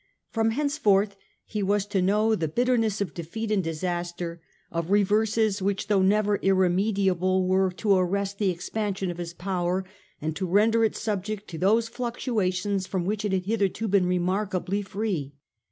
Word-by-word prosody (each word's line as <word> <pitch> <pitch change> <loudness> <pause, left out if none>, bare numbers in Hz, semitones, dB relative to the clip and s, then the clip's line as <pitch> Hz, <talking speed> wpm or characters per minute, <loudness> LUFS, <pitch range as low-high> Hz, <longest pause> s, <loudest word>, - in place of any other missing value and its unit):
From 225 -1 +1
henceforth 220 -7 +2 0.3
he 210 - -3
was 200 0 +1
to 205 -2 0
know 210 +4 +3
the 170 -7 0
bitterness 225 +2 +1
of 185 -7 -2
defeat 210 +7 -5
and 200 -3 +2
disaster, 175 +1 -3 0.3
of 165 0 -3
reverses 210 +1 +2
which, 200 +1 -1
though 200 -2 +4
never 205 +1 +2
irre 190 -2 +3
mediable, 185 -2 +1
were 190 0 +3
to 200 +3 +2
arrest 195 +2 0
the 200 -3 +2
expansion 190 +1 -2
of 175 - -8
his 175 0 -5
power 185 0 -1 0.3
and 155 +1 -3
to 190 +1 -2
render 220 +5 +3
it 220 - +1
subject 210 0 -3
to 165 - -6
those 220 +5 +3
fluctuations 205 -6 -1
from 185 -3 -2
which 210 +2 -1
it 205 - -1
had 185 -1 0
hitherto 210 +1 0
been 195 -2 +3
remarkably 185 +2 0
free. 190 -8 -3
195 Hz, 165 wpm, -26 LUFS, 180-215 Hz, 0.3 s, though